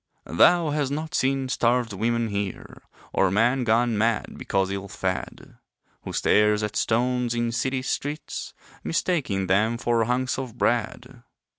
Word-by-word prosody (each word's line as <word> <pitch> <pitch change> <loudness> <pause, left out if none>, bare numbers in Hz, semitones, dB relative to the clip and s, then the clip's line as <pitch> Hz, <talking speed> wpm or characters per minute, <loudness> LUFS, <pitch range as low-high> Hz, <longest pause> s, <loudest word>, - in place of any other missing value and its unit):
Thou 165 - +4
has 145 -2 0
not 155 +3 -4
seen 135 0 +1
starved 120 -2 +1
women 115 +3 0
here, 100 -2 -5 0.3
Or 95 - +3
man 120 +7 +2
gone 115 -1 +2
mad 115 0 0
because 95 -1 -1
ill 100 0 -4
fed 95 -1 -5 0.5
Who - - -5
stares 105 0 +3
at 105 0 -3
stones 120 +1 +1
in 120 0 0
city 130 +3 -1
streets, 145 +3 -4 0.3
Mistaking 145 - 0
them 105 +5 +2
for 115 -1 +1
hunks 130 +2 -1
of 125 -3 -6
bread. 120 +2 -1
120 Hz, 140 wpm, -25 LUFS, 105-130 Hz, 0.5 s, Thou